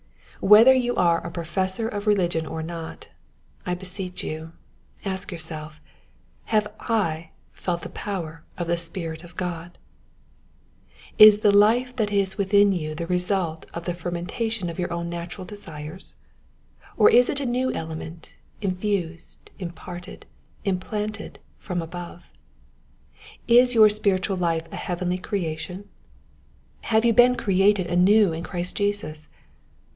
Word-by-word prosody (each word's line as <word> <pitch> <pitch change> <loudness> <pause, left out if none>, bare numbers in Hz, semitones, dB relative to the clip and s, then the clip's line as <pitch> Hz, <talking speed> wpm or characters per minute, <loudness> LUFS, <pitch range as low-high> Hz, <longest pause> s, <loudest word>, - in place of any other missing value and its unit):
Whether 220 +6 +8
you 245 -2 +1
are 170 -2 +3
a 170 - -5
professor 185 +5 -2
of 205 -1 -5
religion 175 -6 +1
or 160 0 -4
not, 165 0 -7 0.5
I 180 - -2
beseech 185 0 -6
you, 160 +1 -6 0.5
ask 190 +1 -3
yourself 155 -2 -7 0.3
— - - -36
Have 210 -1 +3
I 170 -8 -1 0.2
felt 175 -2 -3
the - - -6
power 165 -6 -5
of 175 - -2
tlie 170 0 +1
Spirit 165 -1 -2
of 175 0 -14
God? 175 -1 -5 1.4
Is 215 -1 +10
the 210 -2 +5
life 240 +5 +4
that 210 -3 0
is 195 -1 0
within 200 +1 +4
you 155 -4 -3
the 170 +1 -4
result 180 -2 -1
of 170 0 -5
the 175 - -1
fer 175 0 -5
mentation 185 +4 -3
of 170 - -10
your 175 - -2
own 170 0 -3
natural 170 +2 -6
desires? 165 -3 -9 0.8
Or - - +7
is 245 +1 +6
it 280 - 0
a 280 - -3
new 255 +1 0
element, 160 +1 -7 0.3
infused, 185 -4 -3
imparted, 180 +1 -8 0.4
implanted 210 +2 -3 0.2
from 180 -3 -3
above? 175 +1 -8 1.2
Is 245 +1 +6
your 215 -1 +8
spiritual 195 -2 0
life 165 -2 0
a - - -6
heavenly 180 0 -2
creatt 180 0 -4 0.6
»? - - -34
Have 220 0 +3
you 230 - +4
been 245 +2 +6
created 195 -2 +2
anew 180 +2 +4
in 160 - -4
Christ 180 0 -4
Jesus? 200 -7 -2
180 Hz, 140 wpm, -24 LUFS, 170-205 Hz, 1.4 s, Is